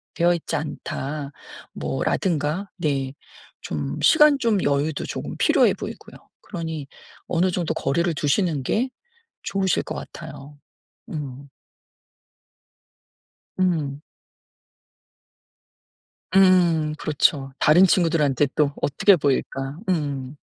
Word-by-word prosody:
되어 175 Hz, +1 st, +3 dB
있지 165 Hz, 0 st, -4 dB
않다." 145 Hz, -1 st, -5 dB, 0.4 s
뭐 -, -, -3 dB
라든가 170 Hz, +2 st, -1 dB
네 140 Hz, -5 st, -1 dB, 0.5 s
좀 70 Hz, -2 st, -4 dB
시간 300 Hz, -2 st, +6 dB
좀 225 Hz, -6 st, +1 dB
여유도 145 Hz, +1 st, 0 dB
좀 -, -, -5 dB, 0.2 s
필요해 -, -, +4 dB
보이고요. -, -, -8 dB, 0.2 s
그러니 160 Hz, -4 st, -5 dB, 0.4 s
어느 175 Hz, +2 st, +1 dB
정도 175 Hz, -2 st, -1 dB
거리를 170 Hz, +5 st, 0 dB
두시는 150 Hz, 0 st, +1 dB
게 235 Hz, -, 0 dB, 0.5 s
좋으실 190 Hz, -3 st, 0 dB
것 -, -, -6 dB
같아요. 145 Hz, +2 st, -9 dB, 0.5 s
음. 140 Hz, -2 st, -6 dB, 2.1 s
음. 155 Hz, -7 st, 0 dB, 2.4 s
음 175 Hz, -5 st, +4 dB
그렇죠. 140 Hz, -2 st, +1 dB
다른 165 Hz, +5 st, +6 dB
친구들한테 160 Hz, -6 st, +2 dB
또 145 Hz, -2 st, +2 dB
어떻게 185 Hz, +7 st, +4 dB
보일까? 135 Hz, -1 st, -1 dB
음. 145 Hz, -5 st, -2 dB
155 Hz, 200 characters per minute, -23 LUFS, 140-175 Hz, 2.4 s, 시간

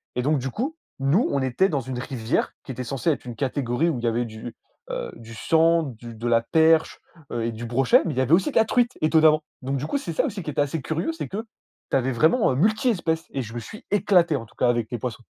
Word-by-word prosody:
Et 125 Hz, -, -1 dB
donc, 150 Hz, 0 st, +2 dB
du 135 Hz, +1 st, -3 dB
coup, 270 Hz, -, -3 dB, 0.2 s
nous, 140 Hz, -, +2 dB
on 140 Hz, -, 0 dB
était 130 Hz, +10 st, +2 dB
dans 140 Hz, -4 st, -1 dB
une 125 Hz, 0 st, -5 dB
rivière 125 Hz, -2 st, -2 dB
qui -, -, -7 dB
était 125 Hz, 0 st, -5 dB
censée 135 Hz, +6 st, 0 dB
être 135 Hz, -4 st, -4 dB
une 120 Hz, -2 st, -6 dB
catégorie 135 Hz, +3 st, 0 dB
où 130 Hz, -7 st, -2 dB
il -, -, -9 dB
y -, -, +1 dB
avait 120 Hz, +1 st, 0 dB
du, 110 Hz, +1 st, -8 dB, 0.3 s
heu, -, -, -4 dB
du 115 Hz, 0 st, -11 dB
sandre, 165 Hz, +2 st, +2 dB
du 115 Hz, +1 st, -10 dB
de 115 Hz, +2 st, -4 dB
la 115 Hz, -1 st, +4 dB
perche, 160 Hz, +4 st, +3 dB, 0.3 s
heu 120 Hz, -1 st, -2 dB
et 115 Hz, -, -1 dB
du 115 Hz, +1 st, -7 dB
brochet, 135 Hz, -, +4 dB
mais 165 Hz, -, -1 dB
il -, -, -8 dB
y -, -, +3 dB
avait 130 Hz, +3 st, -1 dB
aussi 190 Hz, -, +4 dB
de -, -, -17 dB
la 225 Hz, -, +5 dB
truite, 245 Hz, +1 st, +1 dB
étonnamment. 155 Hz, 0 st, +4 dB, 0.2 s
Donc, 135 Hz, +1 st, -2 dB
du 140 Hz, -, -3 dB
coup, 285 Hz, -, -1 dB
c'est 170 Hz, -11 st, -5 dB
ça -, -, +1 dB
aussi 200 Hz, -4 st, -4 dB
qui 155 Hz, -, -5 dB
est -, -, -4 dB
assez 145 Hz, +1 st, 0 dB
curieux, 160 Hz, +3 st, -2 dB
c'est 155 Hz, -4 st, -5 dB
que 220 Hz, +4 st, -5 dB, 0.5 s
tu -, -, +2 dB
avais 130 Hz, 0 st, 0 dB
vraiment, 160 Hz, -, +3 dB
heu, -, -, -1 dB
multi-espèces 185 Hz, -, +1 dB
et 135 Hz, -, -2 dB
je 115 Hz, 0 st, -9 dB
me 120 Hz, -, -4 dB
suis 210 Hz, -, -11 dB
éclaté, 175 Hz, -5 st, +3 dB
en 115 Hz, -4 st, -4 dB
tout -, -, -24 dB
cas, 125 Hz, -, +2 dB
avec 120 Hz, -2 st, 0 dB
les 120 Hz, -, -2 dB
poissons. 120 Hz, 0 st, -5 dB
140 Hz, 270 wpm, -24 LUFS, 120-165 Hz, 0.5 s, la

